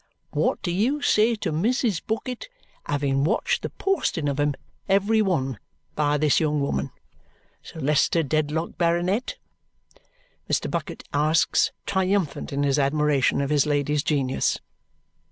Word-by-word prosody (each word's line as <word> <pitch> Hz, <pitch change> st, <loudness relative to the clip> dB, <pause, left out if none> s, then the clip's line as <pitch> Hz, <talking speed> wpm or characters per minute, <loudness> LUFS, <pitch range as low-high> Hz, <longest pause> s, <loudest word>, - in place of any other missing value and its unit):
What -, -, 0 dB
do 175 Hz, -, -1 dB
you 250 Hz, +11 st, 0 dB
say 225 Hz, -1 st, +3 dB
to 210 Hz, -, -3 dB
Mrs. 210 Hz, -, 0 dB
Bucket 250 Hz, -, -4 dB, 0.4 s
having 140 Hz, -1 st, 0 dB
watched 155 Hz, -, +1 dB
the -, -, -4 dB
posting 370 Hz, -, -1 dB
of 140 Hz, 0 st, -1 dB
'em 145 Hz, -1 st, +1 dB, 0.3 s
every 200 Hz, +3 st, +3 dB
one 135 Hz, -, 0 dB, 0.3 s
by 150 Hz, -1 st, +1 dB
this 150 Hz, -1 st, +3 dB
young 150 Hz, -2 st, +1 dB
woman, 140 Hz, -, -1 dB, 0.7 s
Sir 160 Hz, -, -11 dB
Leicester 150 Hz, +3 st, +2 dB
Dedlock, 155 Hz, +3 st, -1 dB
Baronet?" 180 Hz, -, 0 dB, 1.1 s
Mr. -, -, 0 dB
Bucket -, -, -4 dB
asks, 155 Hz, +3 st, +2 dB
triumphant 190 Hz, -4 st, 0 dB
in 140 Hz, +1 st, -1 dB
his 140 Hz, 0 st, +2 dB
admiration 140 Hz, -1 st, +2 dB
of 140 Hz, +1 st, -2 dB
his 150 Hz, 0 st, +3 dB
lady's 145 Hz, 0 st, +1 dB
genius. 135 Hz, -3 st, 0 dB
155 Hz, 135 wpm, -24 LUFS, 145-195 Hz, 1.1 s, say